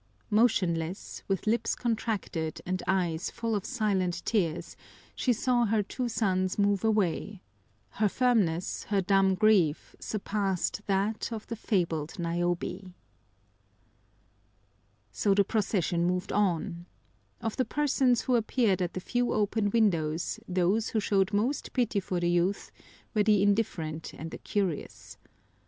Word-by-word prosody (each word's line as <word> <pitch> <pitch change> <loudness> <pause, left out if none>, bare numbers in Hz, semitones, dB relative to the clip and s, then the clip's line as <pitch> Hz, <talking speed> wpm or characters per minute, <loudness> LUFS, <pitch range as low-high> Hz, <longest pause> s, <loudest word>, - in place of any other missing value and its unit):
Motionless, 185 -6 +1
with 195 -3 -1
lips 225 +1 +1
contracted 215 -9 -2
and 185 0 -2
eyes 175 -3 0
full 230 -1 -3
of 205 -3 -1
silent 190 -7 0
tears, 175 -6 -1 0.4
she 255 - +1
saw 240 +1 +2
her 215 -1 +1
two 245 +4 -3
sons 185 -5 0
move 200 -1 +2
away; 210 -2 0 0.6
her 215 -1 +4
firmness, 200 -8 +1
her 205 -2 +1
dumb 195 0 +3
grief 185 -7 +2
surpassed 200 -2 -2
that 205 +4 0
of 220 -2 -5
the 230 - -5
fabled 170 -8 -1
Niobe. 175 +2 -2 2.2
So 195 - +2
the 200 - +5
procession 185 -5 0
moved 180 +2 -1
on. 175 -3 0 0.5
Of 225 - -3
the 260 - +3
persons 270 -4 +2
who 255 - +1
appeared 220 -4 +1
at 175 -1 -1
the - - -3
few 245 +5 0
open 210 0 +1
windows 175 -5 +1
those 185 +4 +1
who 220 - 0
showed 195 -1 +1
most 230 +7 -1
pity 235 -5 +1
for 185 -2 -2
the 175 - 0
youth 175 +3 0 0.4
were 215 - +3
the 205 -2 +4
indifferent 170 -7 -1
and 160 +1 -7
the - - -7
curious. 190 -7 -3
200 Hz, 135 wpm, -29 LUFS, 175-220 Hz, 2.2 s, the